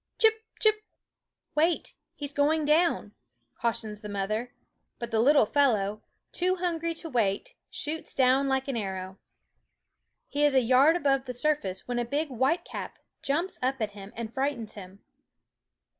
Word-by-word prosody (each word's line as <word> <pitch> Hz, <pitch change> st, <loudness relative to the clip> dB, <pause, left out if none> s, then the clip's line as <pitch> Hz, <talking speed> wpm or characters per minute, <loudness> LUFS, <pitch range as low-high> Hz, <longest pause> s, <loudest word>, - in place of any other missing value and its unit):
Chip, 445 Hz, 0 st, +4 dB, 0.2 s
chip! 430 Hz, -1 st, +3 dB, 0.7 s
"wait, 325 Hz, +3 st, +1 dB, 0.2 s
he's 285 Hz, -1 st, -5 dB
going 300 Hz, +2 st, +2 dB
down," 305 Hz, -8 st, +2 dB, 0.5 s
cautions 225 Hz, -2 st, -2 dB
the 210 Hz, -, -7 dB
mother; 215 Hz, +4 st, -2 dB, 0.5 s
but 235 Hz, 0 st, -6 dB
the 225 Hz, -, +2 dB
little 280 Hz, +1 st, +6 dB
fellow, 215 Hz, -6 st, +2 dB, 0.3 s
too 365 Hz, +1 st, +1 dB
hungry 335 Hz, -2 st, -2 dB
to 330 Hz, -, -5 dB
wait, 220 Hz, -9 st, 0 dB, 0.2 s
shoots 315 Hz, +2 st, -5 dB
down 265 Hz, +1 st, +4 dB
like 265 Hz, 0 st, 0 dB
an 270 Hz, -, -2 dB
arrow. 190 Hz, -3 st, -4 dB, 1.1 s
He 290 Hz, +1 st, -1 dB
is 290 Hz, -2 st, +4 dB
a 260 Hz, -, +6 dB
yard 260 Hz, +7 st, +5 dB
above 275 Hz, -5 st, +1 dB
the 250 Hz, -1 st, -5 dB
surface 245 Hz, -9 st, -1 dB
when 245 Hz, -1 st, -1 dB
a -, -, +1 dB
big 290 Hz, +5 st, -1 dB
whitecap 265 Hz, +7 st, -1 dB, 0.2 s
jumps 330 Hz, +7 st, -1 dB
up 260 Hz, +1 st, 0 dB
at 215 Hz, -2 st, -1 dB
him 200 Hz, 0 st, -10 dB
and 230 Hz, 0 st, -5 dB
frightens 265 Hz, -5 st, -2 dB
him. 195 Hz, -1 st, -11 dB
265 Hz, 150 wpm, -28 LUFS, 220-300 Hz, 1.1 s, little